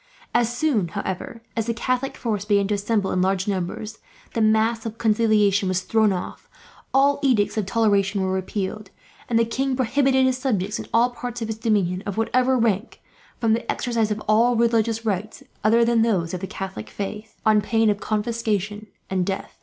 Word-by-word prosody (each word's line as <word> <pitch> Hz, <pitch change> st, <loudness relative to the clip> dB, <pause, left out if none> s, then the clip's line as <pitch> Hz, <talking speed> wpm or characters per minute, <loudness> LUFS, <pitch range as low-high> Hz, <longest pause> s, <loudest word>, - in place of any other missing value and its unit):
As 240 Hz, 0 st, +2 dB
soon, 250 Hz, -, +1 dB
however, 200 Hz, +6 st, -5 dB
as 225 Hz, -1 st, -1 dB
the 230 Hz, -, -1 dB
Catholic 255 Hz, +3 st, -1 dB
forces 210 Hz, -4 st, -2 dB
began 200 Hz, -2 st, +3 dB
to -, -, +1 dB
assemble 205 Hz, 0 st, 0 dB
in 185 Hz, -, +1 dB
large 190 Hz, +1 st, +1 dB
numbers, 205 Hz, +3 st, -3 dB, 0.3 s
the 230 Hz, -, 0 dB
mask 220 Hz, +1 st, +2 dB
of 225 Hz, -1 st, -6 dB
conciliation 215 Hz, -3 st, +3 dB
was 185 Hz, 0 st, 0 dB
thrown 220 Hz, 0 st, +3 dB
off, 180 Hz, -2 st, -5 dB, 0.4 s
all 280 Hz, +1 st, +3 dB
edicts 245 Hz, -8 st, +2 dB
of 215 Hz, -4 st, -1 dB
toleration 200 Hz, -2 st, +2 dB
were 190 Hz, -, 0 dB
repealed, 190 Hz, +2 st, -3 dB, 0.4 s
and 230 Hz, -, +2 dB
the 230 Hz, -, +4 dB
king 265 Hz, +3 st, -1 dB
prohibited 265 Hz, +1 st, +2 dB
his 260 Hz, 0 st, +1 dB
subjects 215 Hz, -5 st, -1 dB
in -, -, -7 dB
all 240 Hz, +2 st, +3 dB
parts 245 Hz, -1 st, -5 dB
of 220 Hz, -, -5 dB
his 220 Hz, 0 st, -4 dB
dominions, 195 Hz, -5 st, +1 dB
of 200 Hz, -, -4 dB
whatever 255 Hz, +3 st, +2 dB
rank, 225 Hz, -1 st, 0 dB, 0.4 s
from 225 Hz, -2 st, +2 dB
the 230 Hz, -, -1 dB
exercise 230 Hz, -3 st, -1 dB
of 210 Hz, 0 st, -3 dB
all 230 Hz, +3 st, +4 dB
religious 230 Hz, -1 st, +1 dB
rites 215 Hz, +5 st, -3 dB, 0.2 s
other 230 Hz, +2 st, +4 dB
than 235 Hz, -1 st, +3 dB
those 185 Hz, -7 st, +1 dB
of 185 Hz, -, -3 dB
the 190 Hz, -, -5 dB
Catholic 185 Hz, -, -6 dB
faith, 210 Hz, +2 st, -6 dB
on 215 Hz, -1 st, +5 dB
pain 225 Hz, 0 st, +2 dB
of 205 Hz, -, -3 dB
confiscation 215 Hz, -2 st, -2 dB, 0.2 s
and 185 Hz, -1 st, 0 dB
death. 190 Hz, +1 st, -5 dB
220 Hz, 185 wpm, -23 LUFS, 200-235 Hz, 0.4 s, on